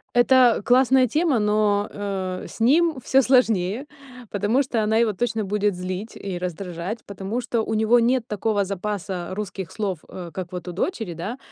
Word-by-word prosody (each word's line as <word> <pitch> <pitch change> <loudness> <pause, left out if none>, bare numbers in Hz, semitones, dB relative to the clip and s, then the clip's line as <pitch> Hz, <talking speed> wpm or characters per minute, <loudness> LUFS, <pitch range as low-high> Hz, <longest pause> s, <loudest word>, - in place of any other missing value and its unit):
Это 245 -1 +5
классная 255 +1 +5
тема, 305 +1 +1
но, 210 -1 +2
э, 190 -2 -4
с - - -12
ним 310 +7 +3
всё 270 - +4
сложнее, 230 -3 +2 0.5
потому 210 +7 +1
что 245 -4 -1
она 220 +1 +2
его 225 -2 +2
точно 225 +2 -1
будет 205 0 0
злить 185 +4 -5
и 195 -3 -5
раздражать, 180 +3 -5
потому 200 +4 -4
что 235 -1 -1
у 220 - -3
него 220 +3 +4
нет 240 +1 +2
такого 210 -2 0
запаса 195 -2 -4
русских 195 -3 -5
слов, 195 -6 -3
э, 175 -2 -8
как 185 -2 -6
вот 180 0 -6
у - - -3
дочери, 195 - -3
да. 185 +10 -5
210 Hz, 170 wpm, -23 LUFS, 190-240 Hz, 0.5 s, Это